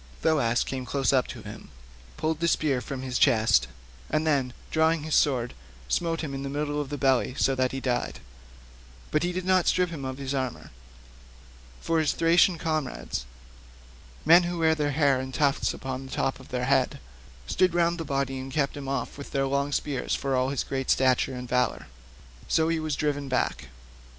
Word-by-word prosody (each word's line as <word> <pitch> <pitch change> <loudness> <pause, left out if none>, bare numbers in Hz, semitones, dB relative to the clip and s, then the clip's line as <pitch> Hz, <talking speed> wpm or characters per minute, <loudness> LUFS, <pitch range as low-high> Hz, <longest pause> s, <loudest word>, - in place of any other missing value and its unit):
Thoas 125 -7 +2
came 130 -1 -4
close 135 +1 0
up 130 -2 +3
to - - -8
him, - - -10 0.5
pulled 155 0 -1
the 170 - +1
spear 150 -5 +2
out 125 - -7
of 130 -1 -4
his 125 -2 -2
chest, 110 - +4 0.4
and 155 +1 0
then 135 -5 +1 0.2
drawing 160 0 +2
his 155 0 -3
sword, 125 -5 +2 0.3
smote 165 -1 0
him 150 -4 -4
in 135 - -4
the 140 - -4
middle 145 +1 -2
of 140 - -6
the 145 - -4
belly 130 -2 +2
so 135 - +2
that 130 -1 +1
he 135 - -3
died; 125 -2 -2 0.9
but 150 - +2
he 175 +1 0
did 180 0 -4
not 185 -1 +3
strip 180 -1 +2
him 150 -5 -6
of 130 0 -4
his 135 0 -4
armour, 130 -3 -3 1.1
for 165 -1 +1
his 155 -2 +2
Thracian 170 +2 +4
comrades, 155 - -3 1.0
men 170 +3 +8
who 175 0 -3
wear 160 -1 +3
their 150 -2 0
hair 140 -2 +2
in 130 - -5
a - - -11
tuft 140 -1 +1
at - - -8
the 130 0 -5
top 135 - -1
of 130 - -13
their 125 0 -2
heads, 135 -1 +2 0.5
stood 180 - +2
round 170 0 +2
the - - -2
body 135 -2 -2
and 130 +1 -7
kept 140 -1 0
him 140 -2 -7
off 140 +1 -3
with 140 - -8
their 135 0 0
long 140 +1 0
spears 140 -2 -1
for 135 -1 -1
all 130 +1 +1
his 140 -2 -1
great 135 -1 -3
stature 130 0 +3
and 125 0 -6
valour; 125 -2 0 0.6
so 160 0 +2
he 165 -1 +1
was 155 -2 -2
driven 145 -2 -1
back. 130 - -1
140 Hz, 200 wpm, -27 LUFS, 130-160 Hz, 1.1 s, men